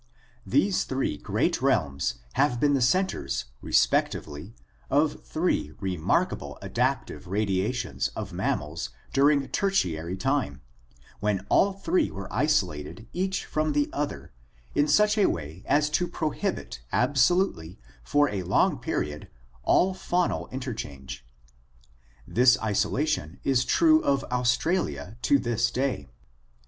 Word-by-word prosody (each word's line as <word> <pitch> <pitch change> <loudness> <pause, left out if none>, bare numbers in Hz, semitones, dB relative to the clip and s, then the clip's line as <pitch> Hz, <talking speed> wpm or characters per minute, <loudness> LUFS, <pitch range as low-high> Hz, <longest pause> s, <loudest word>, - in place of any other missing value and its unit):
These 185 +9 +2
three 130 - -1
great - - -1
realms 70 -3 +1 0.2
have 135 -4 +2
been 145 +1 +3
the 135 - +2
centers 130 - +1 0.2
respec - - +3
tively 75 +9 -8 0.4
of 145 +2 +1
three 170 +3 -1
remarkable 95 -6 -1
adaptive - - -2
radiations 100 +4 -1
of - - -5
mammals 75 +3 -2 0.2
during 140 0 +3
Tertiary 90 - 0
time, 130 - -1 0.6
when 100 -2 -1
all 200 0 +4
three 325 - +1
were - - -7
isolated 110 - 0
each 190 +1 -1
from 155 0 -1
the 145 0 +1
other 145 0 -4 0.4
in 145 - +2
such 210 +7 +4
a 200 - +5
way 80 +2 -4
as 150 +2 +3
to 175 +3 +1
prohibit 155 - -3
absolutely 125 - +2 0.3
for 145 - +3
a 100 -2 -3
long 90 +1 +2
period 75 0 -3 0.3
all 185 - +3
faunal 180 -1 -1
interchange. 110 - -6 1.0
This 125 +2 +5
isolation 105 - -1
is 130 -2 +2
true 315 - +4
of 140 -1 +1
Australia 125 - 0
to 140 - +4
this 120 -2 0
day. 130 +2 -2
130 Hz, 120 wpm, -26 LUFS, 95-150 Hz, 1.0 s, a